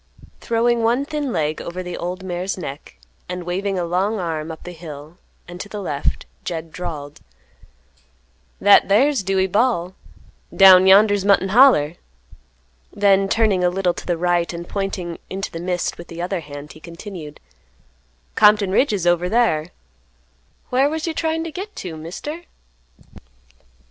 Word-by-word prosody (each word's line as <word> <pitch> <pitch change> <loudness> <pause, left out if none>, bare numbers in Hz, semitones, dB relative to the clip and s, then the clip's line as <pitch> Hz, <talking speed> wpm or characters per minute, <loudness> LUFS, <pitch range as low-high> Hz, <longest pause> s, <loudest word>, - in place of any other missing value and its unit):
Throwing 235 +1 +1
one 240 +5 +1
thin 295 -3 -3
leg 155 -5 -1
over 180 +2 -6
the 180 -1 -6
old 180 +2 -5
mare's 185 +1 -3
neck, 140 - -8 0.3
and 180 0 -4
waving 190 +3 -2
a 175 - -1
long 190 +6 0
arm 165 -3 -3
up 160 - -10
the 180 - -8
hill 160 0 -11 0.3
and 175 +1 -8
to 205 - -8
the 210 - -6
left, 145 -7 -2 0.2
Jed 165 -2 -5
drawled, 155 -5 -7 1.4
"That 205 0 +6
thar's 260 +5 +3
Dewey 190 0 +1
Bal'; 190 -3 0 0.6
down 190 -1 +8
yonder's 205 0 +5
Mutton 195 -1 +3
Holler." 195 - +5 0.9
Then 195 -1 +3
turning 205 -5 +2
a 180 - +4
little 180 -1 0
to - - -9
the 175 -2 0
right 175 0 +1
and 170 0 -7
pointing 190 -4 -4
into 195 +1 -4
the 165 - -6
mist 180 0 -2
with 170 - -9
the 170 - -9
other 180 +1 -2
hand, 145 -1 -10
he 155 - -14
continued, 170 -2 -9 0.9
"Compton 210 -2 +4
Ridge 245 +4 +2
is 190 -4 -2
over 175 +1 +2
thar. 205 -9 +2 1.0
Whar 265 +3 +3
was 320 +2 -3
you 330 - -2
tryin' 320 0 -1
to 330 - -6
git 395 +5 -7
to, 175 -4 -6
Mister?" 245 - -7
185 Hz, 155 wpm, -21 LUFS, 170-210 Hz, 1.4 s, down